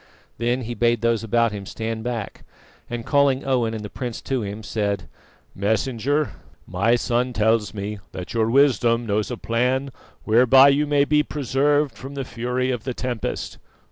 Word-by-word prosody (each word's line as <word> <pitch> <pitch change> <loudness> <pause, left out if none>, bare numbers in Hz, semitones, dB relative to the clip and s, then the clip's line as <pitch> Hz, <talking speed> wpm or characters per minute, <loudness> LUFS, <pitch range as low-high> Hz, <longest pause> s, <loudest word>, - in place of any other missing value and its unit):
Then 120 +2 0
he 120 0 -4
bade 120 -1 +1
those 115 -1 +1
about 115 +1 +2
him 100 -2 -7
stand 110 0 -4
back, 120 -3 -5 0.5
and 120 -1 -5
calling 140 -2 +2
Owen 120 -4 +1
and 105 -1 -5
the - - -4
prince 120 -3 -5
to 130 -2 -1
him, 105 +1 -5
said: 100 -6 -2 0.5
"Messenger, 115 +6 0 0.3
my 100 +7 +2
son 120 +1 0
tells 110 0 +2
me 105 0 -5
that 90 -1 -7
your 115 -1 +1
wisdom 120 -3 +3
knows 105 -1 0
a 125 - -4
plan 125 +5 0 0.3
whereby 130 +5 +6
you 145 +2 +2
may 145 -1 +3
be 150 +1 +3
preserved 145 0 +1
from 135 +2 -9
the 135 -1 -3
fury 125 +2 -2
of 120 -3 -3
the 130 -2 -4
tempest. 120 -4 -4
120 Hz, 170 wpm, -23 LUFS, 110-130 Hz, 0.5 s, whereby